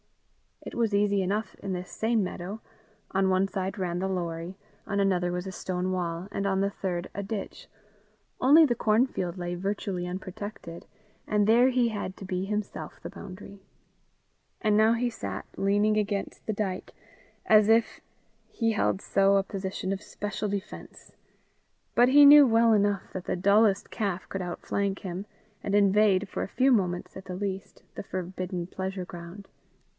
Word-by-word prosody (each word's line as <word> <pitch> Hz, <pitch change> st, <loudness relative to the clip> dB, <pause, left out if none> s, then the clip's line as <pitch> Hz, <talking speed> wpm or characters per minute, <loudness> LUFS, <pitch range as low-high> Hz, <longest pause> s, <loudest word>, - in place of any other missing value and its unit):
It -, -, -8 dB
was 225 Hz, -3 st, +1 dB
easy 200 Hz, -1 st, +2 dB
enough 200 Hz, +2 st, -2 dB
in 195 Hz, -1 st, -4 dB
this 180 Hz, 0 st, -5 dB
same 225 Hz, -1 st, +1 dB
meadow: 190 Hz, +4 st, -5 dB, 0.5 s
on 190 Hz, 0 st, +2 dB
one 190 Hz, +1 st, +2 dB
side 190 Hz, 0 st, -3 dB
ran 180 Hz, -2 st, -2 dB
the 190 Hz, -, -1 dB
Lorrie; 175 Hz, -1 st, -4 dB, 0.3 s
on 200 Hz, -1 st, -1 dB
another 180 Hz, -3 st, +1 dB
was 180 Hz, +1 st, -3 dB
a 190 Hz, -, -5 dB
stone 185 Hz, 0 st, -3 dB
wall; 175 Hz, -1 st, -3 dB
and 200 Hz, -, -2 dB
on 190 Hz, 0 st, +1 dB
the 200 Hz, -, +1 dB
third 180 Hz, -3 st, -4 dB
a 200 Hz, -, -4 dB
ditch; 200 Hz, 0 st, -6 dB, 0.7 s
only 300 Hz, +5 st, +7 dB
the 255 Hz, -, +2 dB
cornfield 215 Hz, -6 st, +1 dB
lay 175 Hz, 0 st, -3 dB
virtually 185 Hz, -1 st, -3 dB
unprotected, 185 Hz, -1 st, -7 dB, 0.4 s
and 210 Hz, -1 st, +2 dB
there 235 Hz, +4 st, +5 dB
he 250 Hz, -2 st, +2 dB
had 205 Hz, -3 st, -4 dB
to 195 Hz, -, -8 dB
be 185 Hz, 0 st, -2 dB
himself 210 Hz, 0 st, -4 dB
the -, -, -6 dB
boundary. 195 Hz, +1 st, -10 dB, 1.0 s
And 215 Hz, -2 st, +2 dB
now 220 Hz, +1 st, +5 dB
he 240 Hz, +1 st, 0 dB
sat 100 Hz, -, -6 dB
leaning 205 Hz, +2 st, +2 dB
against 205 Hz, -1 st, -2 dB
the 220 Hz, -, 0 dB
dyke, 195 Hz, -3 st, -3 dB, 0.5 s
as 215 Hz, -1 st, +6 dB
if 225 Hz, 0 st, +3 dB, 0.5 s
he 225 Hz, -1 st, 0 dB
held 205 Hz, -2 st, 0 dB
so 195 Hz, 0 st, +3 dB
a 195 Hz, -, +2 dB
position 190 Hz, -1 st, -4 dB
of 195 Hz, -, -5 dB
special 210 Hz, 0 st, -4 dB
defence; 200 Hz, 0 st, -7 dB, 0.8 s
but 245 Hz, +1 st, +5 dB
he 290 Hz, +2 st, +8 dB
knew 290 Hz, -1 st, +9 dB
well 230 Hz, 0 st, +4 dB
enough 205 Hz, -2 st, +1 dB
that 185 Hz, -, -5 dB
the -, -, -1 dB
dullest 200 Hz, +2 st, +3 dB
calf 195 Hz, -4 st, -3 dB
could 195 Hz, -, -4 dB
outflank 195 Hz, +2 st, -2 dB
him, 185 Hz, +1 st, -5 dB, 0.4 s
and 200 Hz, -, 0 dB
invade, 205 Hz, -1 st, +4 dB
for -, -, -4 dB
a -, -, -4 dB
few 265 Hz, +6 st, +2 dB
moments 180 Hz, -6 st, 0 dB
at 190 Hz, -, -10 dB
the 185 Hz, -, -6 dB
least, 195 Hz, 0 st, -5 dB
the -, -, -5 dB
forbidden 185 Hz, -1 st, -4 dB
pleasure 190 Hz, +1 st, -5 dB
ground. 175 Hz, +3 st, -10 dB
195 Hz, 170 wpm, -27 LUFS, 185-210 Hz, 1.0 s, knew